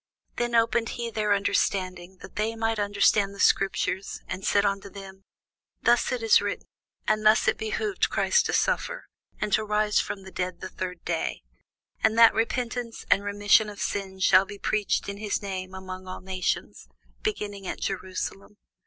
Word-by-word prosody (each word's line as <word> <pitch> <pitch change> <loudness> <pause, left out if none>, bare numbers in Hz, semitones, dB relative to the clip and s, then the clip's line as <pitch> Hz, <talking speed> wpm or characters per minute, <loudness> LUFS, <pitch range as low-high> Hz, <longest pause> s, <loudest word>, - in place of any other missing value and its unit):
Then 240 0 0
opened 230 0 +2
he 235 -1 -3
their 210 -1 -1
understanding, 185 -2 -1
that - - -11
they 220 +2 -1
might 225 -1 -1
understand 205 0 +2
the - - -13
scriptures, 195 -1 +1
and 185 - -5
said 200 0 +3
unto 200 0 -1
them, 195 0 -11 0.6
Thus 240 0 +3
it 250 -2 -2
is 225 - +6
written, - - -3 0.4
and 215 0 +2
thus 215 +1 +5
it - - +4
behoved 380 - -1
Christ 475 - +2
to - - -2
suffer, - - 0 0.3
and 210 -2 -2
to 215 - +3
rise 210 0 +2
from 195 - -3
the 190 - -11
dead 180 -1 -3
the 185 - -6
third 180 -2 -6
day: 165 - -2 0.6
and 220 0 +3
that 230 0 +8
repentance 235 0 -2
and 200 - +4
remission 205 +1 +3
of 205 - -10
sins 190 -2 -3
should 190 +1 +6
be 205 - -8
preached 210 +1 0
in 200 0 -5
his 210 0 -1
name 190 -1 -5
among 185 0 -8
all 185 - -7
nations, 185 -1 -3 0.3
beginning 205 - -3
at - - -4
Jerusalem. 195 +2 -4
205 Hz, 170 wpm, -26 LUFS, 190-220 Hz, 0.6 s, that